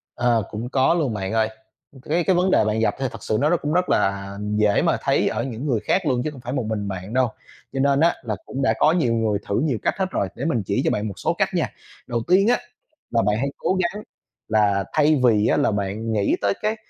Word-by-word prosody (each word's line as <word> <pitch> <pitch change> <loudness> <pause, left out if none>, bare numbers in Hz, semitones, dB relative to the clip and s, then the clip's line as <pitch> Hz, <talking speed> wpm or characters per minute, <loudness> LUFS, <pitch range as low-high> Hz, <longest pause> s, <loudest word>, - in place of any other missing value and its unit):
Ờ, 120 -2 +2
cũng 110 +3 -5
có 130 +3 +3
luôn, 150 -9 0
bạn 95 0 -3
ơi. 110 -1 +2 0.5
Cái 165 +4 0
cái 185 -2 +3
vấn 185 +2 +2
đề 145 - +4
bạn 105 +1 0
gặp 110 - +1
thì 135 - -1
thật - - -10
sự 110 - 0
nó 150 - +2
rất 175 - +4
cũng 145 - -1
rất 180 +2 +1
là 100 0 0 0.2
dễ 105 -1 +3
mà - - +2
thấy - - +2
ở 115 +1 -2
những 130 +1 -5
người 120 -7 +1
khác 185 -3 +1
luôn 130 -4 +1
chứ 155 - -1
không 140 -4 -12
phải 120 +1 -6
một 130 -5 -1
mình 105 -2 -2
bạn 95 +3 -6
đâu. 130 -1 +3 0.4
Cho 135 - -2
nên 140 0 +3
á, 170 +2 +4
là 110 -5 -3
cũng 135 - -4
đã - - +3
có 155 - +4
nhiều 135 -10 +1
người 110 -3 +1
thử 100 - +1
nhiều 135 -8 0
cách - - +1
hết 190 - +1
rồi, 100 - -1
để 135 - -5
mình 145 -9 0
chỉ 100 - 0
cho - - +2
bạn 105 +1 -1
một 100 - -6
số - - -1
cách - - +2
nha. - - 0 0.3
Đầu 120 -2 -2
tiên 195 +4 +4
á, 245 - +5 0.6
là 115 - +3
bạn 105 +1 +2
hãy 135 - -1
cố 185 - 0
gắng 205 +5 -3 0.4
là 105 -3 +2
thay 150 -2 +3
vì 110 -4 +4
á - - +2
là - - +2
bạn 105 +2 -2
nghĩ 100 -2 +2
tới 100 -1 +2
cái 215 +1 0
120 Hz, 265 wpm, -22 LUFS, 105-150 Hz, 0.6 s, á